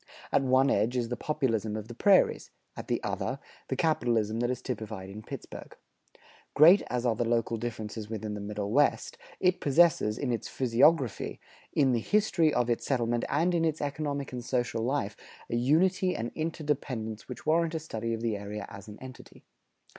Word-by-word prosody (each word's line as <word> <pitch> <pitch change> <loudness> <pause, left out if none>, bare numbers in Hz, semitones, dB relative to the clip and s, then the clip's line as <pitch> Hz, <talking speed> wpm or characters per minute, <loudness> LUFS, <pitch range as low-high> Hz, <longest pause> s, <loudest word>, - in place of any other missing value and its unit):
At - - +3
one 130 +1 +3
edge 115 +5 +1
is 120 -2 -1
the 125 - -2
Populism 115 -8 -1
of 110 0 -5
the 120 - -8
prairies; 195 - +3 0.3
at - - -8
the - - -1
other, - - -2 0.3
the - - -2
capitalism 115 -9 +1
that 120 0 0
is 125 -1 -2
typified 110 -5 -6
in 105 +2 -8
Pittsburgh. - - -9 0.8
Great 170 +7 +8
as 125 0 -2
are 120 - +3
the 120 - 0
local 115 0 0
differences 110 -2 -5
within 110 -1 -4
the 105 - -5
Middle 105 0 -4
West, 145 +5 +1 0.2
it 180 -1 +2
possesses, 140 -7 +3
in 135 -3 -2
its 115 - -2
physiography, 130 0 +2 0.3
in 135 -3 +3
the 120 - +2
history 170 - +2
of 125 -3 +1
its 120 -1 0
settlement, 120 -3 0
and 165 +6 +1
in 170 -1 +1
its 155 -2 0
economic 145 -1 -3
and 125 -1 -5
social 120 -2 -1
life, 120 -4 -1 0.4
a - - 0
unity 180 - +2
and 115 +1 -3
interdependence 145 -9 -3
which 125 - -8
warrant 165 +1 +2
a - - -1
study 115 -6 -3
of 110 - -7
the 115 -2 0
area 100 0 -6
as 100 0 -11
an 105 0 -10
entity. 130 -1 -12
120 Hz, 185 wpm, -29 LUFS, 110-150 Hz, 0.8 s, Great